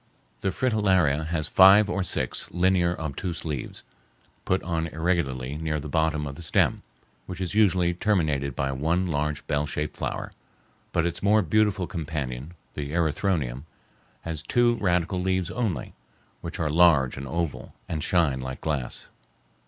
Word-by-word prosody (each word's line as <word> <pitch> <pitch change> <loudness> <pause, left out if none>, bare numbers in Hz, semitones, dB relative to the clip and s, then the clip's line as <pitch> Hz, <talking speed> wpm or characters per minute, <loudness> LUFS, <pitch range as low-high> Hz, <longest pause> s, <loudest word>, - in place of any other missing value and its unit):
The 95 - 0
fritillaria 95 - +2
has 80 -2 0
five 95 +5 +7
or 100 -2 -1
six 90 - -2
linear, 90 0 +2
obtuse 80 +2 -4
leaves, 75 -5 -5 0.6
put 95 +1 +1
on 80 -2 -1
irregularly 75 -5 -1
near 80 -1 -1
the 75 - -7
bottom 80 -1 0
of 70 - -5
the 75 - -10
stem, 85 - +1 0.5
which 90 -1 -6
is 90 -1 -3
usually 90 -5 +3
terminated 80 - 0
by 70 +1 -1
one 80 +7 0
large 75 -2 -2
bell 75 -1 0
shaped 75 0 -3
flower; - - -4 0.6
but 85 -1 +1
its 85 - -3
more 105 +1 +4
beautiful 100 +1 +2
companion, 75 -3 -5 0.2
the 75 0 -5
erythronium, 80 -5 0 0.6
has 80 -2 -4
two 120 +5 +3
radical 90 -1 0
leaves 95 -1 0
only, 105 - -2 0.5
which 85 +3 -6
are 80 -3 0
large 80 -6 +4
and 70 0 -6
oval, 85 +1 -3
and 75 -2 -3
shine 80 -7 +2
like 65 0 -6
glass. 70 -6 -3
80 Hz, 150 wpm, -26 LUFS, 75-90 Hz, 0.6 s, five